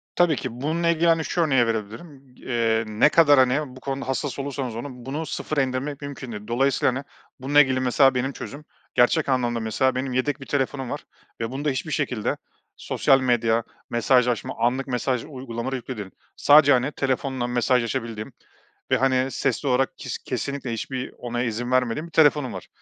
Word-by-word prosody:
Tabii 175 -3 +4
ki 125 -2 -6
bununla 165 +4 0
ilgili 170 0 +2
hani 165 -1 +3
şu 175 - 0
örneği 135 -7 +3
verebilirim. 125 +5 -6
Eee, 115 -2 0
ne 110 +7 +4
kadar 145 -4 +6
hani 130 +1 +1
bu - - -11
konuda 135 0 -4
hassas 135 +1 -2
olursanız 135 -4 -4
olun 125 0 -7
bunu 145 +5 -3
sıfıra 150 -1 -2
indirmek 135 +3 -3
mümkün 140 -3 -7
değil. 105 -1 -8
Dolayısıyla 130 +1 +2
hani 140 - -4 0.4
bununla 145 +3 +5
ilgili 130 -2 +1
mesela 130 +1 +4
benim 130 +2 0
çözümüm, 145 +3 -8 0.3
gerçek 140 +5 +3
anlamda 120 -3 +1
mesela 115 +4 0
benim 130 0 -2
yedek 140 +3 -1
bir - - -7
telefonum 135 -2 -2
var - - -5 0.4
ve 115 +1 -2
bunda 145 +3 -2
hiçbir 140 +3 -3
şekilde 125 -7 -1 0.4
sosyal 135 - +2
medya, 115 -2 +2 0.3
mesajlaşma, 120 0 +2
anlık 130 +3 +1
mesaj 125 -1 -1
uygulamaları 130 -2 -5
yüklü 130 -1 -6
değil. 100 -3 -6 0.3
Sadece 145 -1 +6
hani 130 +3 +1
telefonla 130 -2 -1
mesajlaşabildiğim 120 -2 -1 0.6
ve - - +5
hani 130 0 +1
sesli 135 +2 -1
olarak 130 0 +1
kes - - -5
kesinlikle 140 -4 -4
hiçbir 125 +3 -4
onay, 120 0 -2
izin 120 +2 -3
vermediğim 130 +5 +1
bir - - -17
telefonum 145 -4 +3
var. - - -8
130 Hz, 175 wpm, -24 LUFS, 120-140 Hz, 0.6 s, kadar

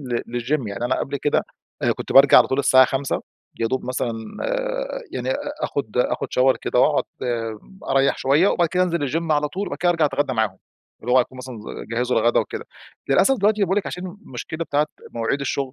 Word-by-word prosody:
لل 120 -2 -3
للgym 135 0 -1
يعني 100 +4 -4
أنا 125 - 0
قبل 140 +1 -2
كده 145 +2 +1 0.4
آآ - - +3
كنت - - -6
بارجع 135 0 +8
على - - +5
طول 130 - 0
الساعة 130 -2 +6
17:00 135 0 -2 0.4
يا 115 - +2
دوب 130 +3 -2
مثلًا 125 -2 -1 1.0
يعني - - -3
أ - - +1 0.3
أخد 125 -5 -3
أخد 125 - 0
shower 130 +1 +5
كده - - -1
وأقعد - - +3 0.9
أريح 135 0 +3
شوية 145 +9 +3
وبعد 170 -2 +2
كده 180 +2 +1
أنزل 170 -6 0
الgym 165 +2 -2
على 150 0 +1
طول 195 +6 -4
وبعد - - -5
كده 175 0 +3
أرجع 165 -3 +2
أتغدى 140 -1 0
معاهم. 110 -5 0 0.4
اللي 125 +2 -2
هو 130 - +6
هيكونوا 130 +1 -1
مثلًا 125 -3 -8
ز 105 - -8
جهّزوا 120 0 +1
الغدا 120 +2 +3
وكده. 445 +2 -5 0.4
للأسف 270 - +4
دلوقتي 210 +1 +2
باقول 190 +1 +1
لِك 205 - -4
عشان 180 +1 -5 0.2
المشكلة 160 - -6
بتاعة 150 0 +1 0.2
مواعيد 115 +4 -1
الشغل 135 -1 -2
135 Hz, 200 wpm, -22 LUFS, 125-165 Hz, 1.0 s, بارجع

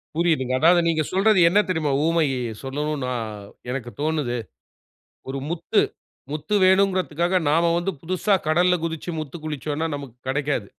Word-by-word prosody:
புரியுதுங்க. 155 -7 +1
அதாவது 175 +4 +5
நீங்க 160 -1 +1
சொல்றது 195 +1 +4
என்ன 200 - +4
தெரியுமா? 160 -5 0
உவமயைய 140 -8 +1
சொல்லணுன்னா 140 -1 -2 0.6
எனக்கு 125 -2 -4
தோணுது. 150 -6 -1 0.9
ஒரு 135 +1 -3
முத்து 170 -1 +1 0.5
முத்து 155 +6 -3
வேணுங்குறதுக்காக 185 -2 +2
நாம 165 +3 +3
வந்து 175 +3 -1
புதுசா 185 +4 +1
கடல்ல 175 +3 +3
குதிச்சு 165 +1 -4
முத்து 155 +1 -7
குளிச்சோன்னா 155 +1 -3
நமக்கு 140 -4 -8
கிடைக்காது. 140 -5 -1
155 Hz, 130 wpm, -23 LUFS, 140-175 Hz, 0.9 s, அதாவது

